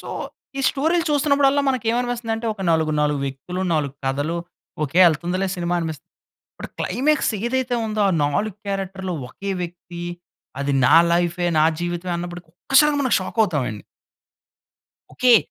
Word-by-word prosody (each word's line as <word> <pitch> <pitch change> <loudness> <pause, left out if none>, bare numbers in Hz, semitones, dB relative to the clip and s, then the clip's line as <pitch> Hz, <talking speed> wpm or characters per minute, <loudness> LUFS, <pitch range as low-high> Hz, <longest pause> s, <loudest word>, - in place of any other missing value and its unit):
So, - - -10 0.5
ఈ - - 0
స్టోరీలు 325 +5 +1
చూస్తున్నప్పుడల్లా 285 -1 +3
మనకి 255 -4 -3
ఏమనిపిస్తుంది 240 -1 -1
అంటే, 225 +1 -5
ఒక 195 - -7
నాలుగు, 160 -1 +2
నాలుగు 150 -1 +1
వ్యక్తులు 135 +7 -5
4 145 -3 -1
కథలు 145 +5 -1 0.5
ఓకే 150 +5 -1
ఎళ్తుందిలే 175 +4 -1
సినిమా 175 0 -1
అనిపిస్. 160 -4 -4 0.5
ఇప్పుడు - - -9
క్లైమాక్స్ 295 0 +1
ఏదైతే 255 0 0
ఉందో, 215 0 -1
ఆ - - +1
4 185 +8 -1
క్యారెక్టర్‌లు 190 -1 -3 0.2
ఒకే 195 +9 -5
వ్యక్తి, 175 0 -7 0.6
అది 140 0 0
నా 130 - +6 0.2
లైఫే, 175 +1 +1
నా 155 - +5 0.2
జీవితమే 175 +1 -3
అన్నప్పుడు 175 0 -6
ఒక్కసారి 285 +10 +3
మనం 260 -3 +1
షాక్ 185 +4 -5
అవుతాం 160 -10 0
అండి. 105 -2 -9 1.3
ఓకె. 245 -3 +6
185 Hz, 145 wpm, -22 LUFS, 165-245 Hz, 1.3 s, నా